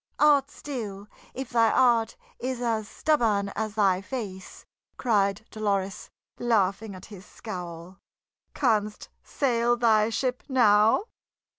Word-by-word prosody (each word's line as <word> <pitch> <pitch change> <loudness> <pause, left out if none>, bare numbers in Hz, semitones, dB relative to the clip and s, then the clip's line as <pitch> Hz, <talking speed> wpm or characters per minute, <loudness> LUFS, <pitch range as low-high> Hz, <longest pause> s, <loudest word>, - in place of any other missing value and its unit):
"Art 290 -2 +4
still, 215 -10 -7 0.3
if 265 -2 -6
thy 230 -2 +4
heart 235 -3 +2 0.2
is 255 0 -3
as 225 -3 -1
stubborn 220 -11 +1
as 215 +1 -4
thy 195 -3 +2
face!" 195 -5 -7 0.3
cried 205 -3 +1
Dolores, 200 -3 -2 0.3
laughing 210 -3 0
at 185 - -11
his 190 -2 -11
scowl. 180 -4 -8 0.6
"Canst 215 -5 0
sail 240 -3 0
thy 220 -2 +3
ship 250 +2 -2
now?" 220 - +4
220 Hz, 115 wpm, -26 LUFS, 200-240 Hz, 0.6 s, Art